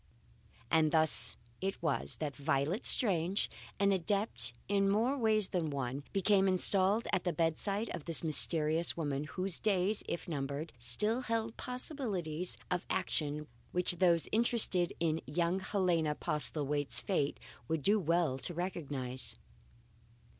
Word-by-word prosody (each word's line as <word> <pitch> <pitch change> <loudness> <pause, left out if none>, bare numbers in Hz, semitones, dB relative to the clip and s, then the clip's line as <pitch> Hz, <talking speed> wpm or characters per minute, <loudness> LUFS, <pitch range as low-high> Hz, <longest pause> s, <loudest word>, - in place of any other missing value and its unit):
And 160 -1 +3
thus 155 -8 +6 0.2
it 195 +1 -3
was 165 - -1
that 145 -4 -5
Violet 150 - -1
Strange 190 -4 +3 0.3
an 200 0 +3
adept 195 - 0 0.2
in 195 0 +1
more 230 +7 +1
ways 220 -5 +2
than 170 -4 -2
one 135 -1 -4
became 195 0 +2
installed 190 +3 +4
at 180 - +1
the 175 - -1
bedside 170 +7 -1
of 150 - -7
this 165 -2 +2
mysterious 160 +1 +2
woman, 145 -3 -3
whose 185 +5 -3
days, 200 0 0
if 170 - -5
numbered, 145 0 -5
still 210 - +3
held 225 -2 -3
possibilities 205 - -4
of 180 0 -1
action 150 -5 -2 0.3
which 180 0 +1
those 170 -2 +2
interested 215 -6 +2
in 160 -1 -1
young 170 +5 -1
Helena 175 -6 0
Postlethwaite's 150 -2 0
fate 150 -8 -2 0.3
would 160 -3 -2
do 210 +6 +3
well 165 -6 0
to 170 +6 -4
recognize. 145 -8 -2
175 Hz, 130 wpm, -32 LUFS, 150-195 Hz, 0.3 s, thus